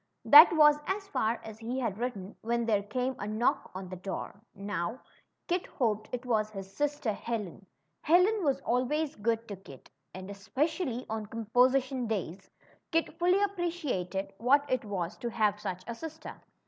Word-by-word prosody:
That 300 +3 +10
was 300 -2 +6
as 395 +1 -2
far 230 - 0
as 220 -1 -9
he 240 +3 -3
had 220 -5 -2
written 215 -5 -4
when 235 +1 0
there 210 -3 +2
came 250 +5 -2
a 205 - -4
knock 235 +6 0
on 185 0 -6
the 185 - -6
door. 195 +2 -6
Now, 195 +2 -3 0.5
Kit 355 0 -1
hoped 215 -4 -1
it 250 0 -4
was 215 -3 +1
his 195 -2 -9
sister 290 -6 -1
Helen. 200 -4 -5 0.3
Helen 365 +6 +4
was 275 -2 +1
always 275 +5 0
good 225 +2 -1
to 200 - -5
Kit; 140 -9 -14 0.2
and, 185 0 -7
esjoecially 255 - -2
on 220 -1 -4
composition 250 +3 +1
days, 190 -3 -4 0.4
Kit 330 0 0
fully 360 +3 +3
appreciated 295 - -2
what 280 +5 +4
it 255 -3 0
was 185 -5 -4
to 240 - -4
have 210 -2 +1
such 185 -3 -5
a 235 - -4
sister. 315 +5 -9
235 Hz, 165 wpm, -30 LUFS, 205-290 Hz, 0.5 s, That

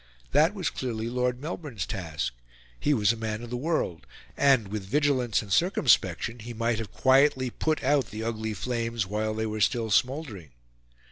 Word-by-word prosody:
That 155 +8 +4
was 185 -6 -1
clearly 115 -3 -3
Lord 125 0 0
Melbourne's 150 - -5
task; 80 -10 -3 0.5
he 150 - +1
was 110 -5 +3
a - - -6
man 110 0 -4
of 120 - -8
the - - -2
world, 120 - -2 0.3
and, 130 -8 +3
with 105 -1 -4
vigilance 130 0 +1
and 100 -2 -3
circumspection, 120 - +2
he 120 +2 -8
might 115 0 0
have 110 -4 -6
quietly 130 -1 +3
put 155 +3 -1
out 140 0 +2
the 110 +1 -5
ugly 110 -1 -3
flames 115 -1 -2
while 110 +2 -2
they 110 0 -1
were 110 0 -3
still 110 +1 +1
smouldering. 125 - 0
115 Hz, 175 wpm, -27 LUFS, 110-135 Hz, 0.5 s, That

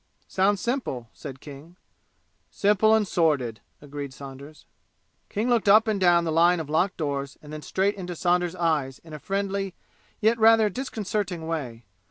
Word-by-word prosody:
"Sounds 195 +1 +1
simple!" 180 - -3
said 135 -2 -9
King. 150 +5 -12 0.7
"Simple 210 +2 +3
and 215 -2 +1
sordid!" 140 - 0 0.2
agreed 140 -2 -7
Saunders. 140 +2 -11 0.6
King 215 +4 -2
looked 235 -4 +2
up 215 +3 +6
and 215 -2 0
down 175 -2 +4
the 165 - -1
line 170 +2 +4
of 150 -2 -6
locked 180 +5 +1
doors 140 -3 -3
and 150 0 -12
then 155 - -6
straight 195 +5 0
into 180 -3 -6
Saunders' 175 0 +1
eyes 155 -7 0
in 160 -2 -15
a 150 - -7
friendly, 195 +1 -2 0.4
yet 225 +2 +2
rather 225 -1 +6
disconcerting 205 -8 -3
way. 130 -8 -5
175 Hz, 160 wpm, -25 LUFS, 145-200 Hz, 0.7 s, up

